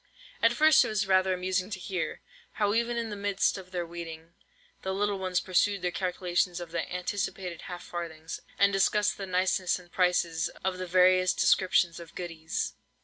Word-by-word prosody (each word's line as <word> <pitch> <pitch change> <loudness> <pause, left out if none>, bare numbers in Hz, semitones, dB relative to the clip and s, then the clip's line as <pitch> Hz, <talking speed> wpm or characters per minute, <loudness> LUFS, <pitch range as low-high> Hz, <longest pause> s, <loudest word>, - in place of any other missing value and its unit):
At - - +5
first 310 0 +6
it - - -2
was 210 -1 0
rather 190 0 +3
amusing 185 +1 -1
to 200 -3 -5
hear, 180 -1 -3 0.3
how 205 -1 +1
even 235 +1 0
in 230 -2 -2
the - - -4
midst 200 -1 +1
of 190 -2 -9
their 180 -1 -3
weeding, 165 -1 -8 0.5
the 190 0 -2
little 205 0 0
ones 185 -1 0
pursued 195 +1 +1
their 180 - 0
calculations 180 -1 -1
of 175 -2 -8
the 170 - -3
anticipated 180 -1 -3
half 175 -1 -6
farthings, 165 -2 -6 0.2
and 200 0 +4
discussed 205 +2 +2
the 195 - -4
niceness 185 0 +1
and 175 -1 -16
prices 175 -2 +1 0.2
of 185 -1 -1
the 185 - -4
various 185 +1 +4
descriptions 180 -2 +3
of 170 -1 -12
"goodies." 165 -3 -4
185 Hz, 180 wpm, -29 LUFS, 175-195 Hz, 0.5 s, first